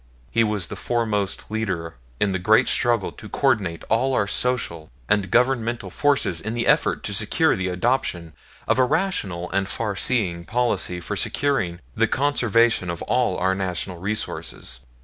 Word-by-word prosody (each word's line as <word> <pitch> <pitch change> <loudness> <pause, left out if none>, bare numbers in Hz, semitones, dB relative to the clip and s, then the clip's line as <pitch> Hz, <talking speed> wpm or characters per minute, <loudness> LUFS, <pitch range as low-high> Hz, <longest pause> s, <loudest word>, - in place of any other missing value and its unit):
He 115 - +3
was 105 -5 0
the - - -5
foremost 110 -5 -1
leader 95 -7 -2 0.3
in 100 - +2
the 95 - -1
great 110 +7 +4
struggle 120 -5 +2
to 105 - -11
coordinate 105 -12 0
all 130 +4 +2
our 100 - +2
social 100 -8 -1 0.2
and 100 -3 +1
governmental 120 -4 +1
forces 105 - +1
in 110 +2 -4
the 120 - -1
effort - - +2
to - - -2
secure - - +2
the 95 0 -2
adoption 90 -4 -1 0.3
of - - +2
a - - +6
rational 100 - -1
and 95 +1 0
farseeing 100 -5 -1
policy 105 -7 0
for - - -4
securing 105 -12 0
the - - +3
conservation 120 -8 +2
of 85 - -4
all - - +1
our 95 +1 +2
national 95 -1 -3
resources. 100 - -4
105 Hz, 155 wpm, -23 LUFS, 90-120 Hz, 0.3 s, a